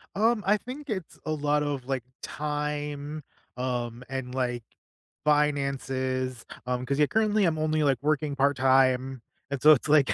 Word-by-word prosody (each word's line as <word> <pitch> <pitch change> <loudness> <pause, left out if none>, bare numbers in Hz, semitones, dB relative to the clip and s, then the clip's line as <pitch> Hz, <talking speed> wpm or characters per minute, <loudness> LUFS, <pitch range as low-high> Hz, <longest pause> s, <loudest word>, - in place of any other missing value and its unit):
Um, 220 +1 +2
I 210 +2 +5
think 270 +7 -8
it's 185 -6 -5
a - - -1
lot 150 -1 +1
of, 140 -4 -3
like, 135 -2 -1 0.2
time, 150 0 -3 0.3
um, 125 -1 -3
and, 130 -2 -5
like, 125 -2 -1 0.6
finances, 135 -4 0 0.2
um, 125 0 -1
'cause 140 +2 -1
yeah, 150 - +5
currently 215 +1 +2
I'm 165 -3 +1
only, 155 0 +1
like, 135 -4 +2
working 150 -1 0
part 140 +1 +2
time, 130 -1 +3 0.3
and 140 -2 -2
so 155 - +9
it's 150 0 +2
like, 145 -2 +5
145 Hz, 160 wpm, -27 LUFS, 130-155 Hz, 0.6 s, so